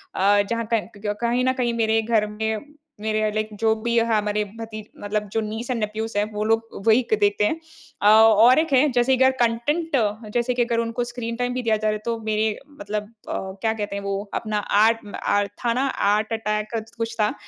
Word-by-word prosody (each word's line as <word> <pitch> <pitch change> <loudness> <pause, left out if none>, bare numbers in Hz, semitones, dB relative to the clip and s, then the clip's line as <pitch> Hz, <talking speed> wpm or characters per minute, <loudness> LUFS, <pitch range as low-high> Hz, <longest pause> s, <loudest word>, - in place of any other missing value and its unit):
अ, 205 +2 +4
जहाँ 230 -1 -2
क 220 - +1
क्क 205 0 -3
कहीं 240 +2 +1
न 260 - +3
कहीं 240 -2 -1
मेरे 225 -1 +2
घर 220 -1 +1
में 220 +7 -4 0.3
मेरे 215 0 0
या 215 0 +1
लाइक 215 0 -2
जो 220 -1 +4
भी 235 0 0
हमारे 210 -2 +1 0.2
भती 220 -1 -6 0.2
मतलब 210 0 -2
जो 225 - +1
नीस 220 +3 -5
एंड 235 - -1
नेफ्यूज़ 215 0 -3
हैं 205 - +3
वो 210 0 -2
लोग 225 +1 +2 0.3
वही 225 +3 +6
क - - +4
देखते 205 0 +2
हैं। 320 +8 0 0.4
अ, 205 - +4
और 225 +4 +7
एक 320 -2 -1
है 270 +3 +5
जैसे 250 +1 +3
अगर 260 0 +5
कंटेंट 290 +8 0 0.4
जैसे 240 +1 +1
की 245 - 0
अगर 235 -1 0
उनको 230 +1 -1
स्क्रीन 240 -1 -5
टाइम 245 0 -2
भी 255 - -2
दिया 225 -2 +2
जा 215 0 -2
रहा - - +3
है - - -2
तो 235 -1 -1
मेरे 215 0 0 0.2
मतलब 210 +1 -3 0.3
अ, - - -2 0.3
क्या 220 0 +1
कहते 205 -2 -4
हैं 200 - -4
वो 200 +1 -3
अपना 215 -1 -2 0.2
आर्ट 225 0 +3
अ, 205 0 +1 0.2
था 230 - +3
ना 260 +3 0 0.2
आर्ट 215 +2 +1
अटैक 215 -1 -1
क 225 - -2
कुछ 230 0 -3
था 210 +3 +2
225 Hz, 225 wpm, -23 LUFS, 210-235 Hz, 0.4 s, और